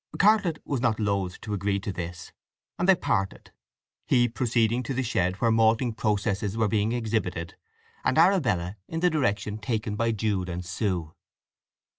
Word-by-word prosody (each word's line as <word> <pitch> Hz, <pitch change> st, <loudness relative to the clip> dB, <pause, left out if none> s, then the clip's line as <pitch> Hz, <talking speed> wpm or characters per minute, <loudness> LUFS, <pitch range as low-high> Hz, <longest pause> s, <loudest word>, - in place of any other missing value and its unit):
Cartlett 200 Hz, -6 st, +4 dB
was 135 Hz, -4 st, -2 dB
not 115 Hz, -3 st, +1 dB
loath 100 Hz, -4 st, -1 dB
to 105 Hz, -, -5 dB
agree 100 Hz, 0 st, 0 dB
to 100 Hz, +1 st, -4 dB
this, 85 Hz, -1 st, -6 dB, 0.5 s
and 180 Hz, +3 st, +1 dB
they 190 Hz, -, +8 dB
parted—he 120 Hz, -, -2 dB
proceeding 120 Hz, 0 st, +1 dB
to 130 Hz, +1 st, -4 dB
the 130 Hz, -, 0 dB
shed 90 Hz, -6 st, 0 dB
where 115 Hz, +3 st, +1 dB
malting 115 Hz, +1 st, +3 dB
processes 105 Hz, -1 st, -1 dB
were 110 Hz, -1 st, +2 dB
being 105 Hz, +1 st, +1 dB
exhibited, 110 Hz, -8 st, -2 dB, 0.5 s
and 130 Hz, -, +1 dB
Arabella 115 Hz, -, +3 dB
in 165 Hz, 0 st, -4 dB
the 180 Hz, 0 st, +3 dB
direction 105 Hz, -8 st, -1 dB
taken 110 Hz, -1 st, -2 dB
by 115 Hz, +2 st, +1 dB
Jude 100 Hz, -4 st, -1 dB
and 90 Hz, +1 st, -4 dB
Sue. 90 Hz, -4 st, -2 dB
110 Hz, 155 wpm, -26 LUFS, 100-120 Hz, 0.5 s, they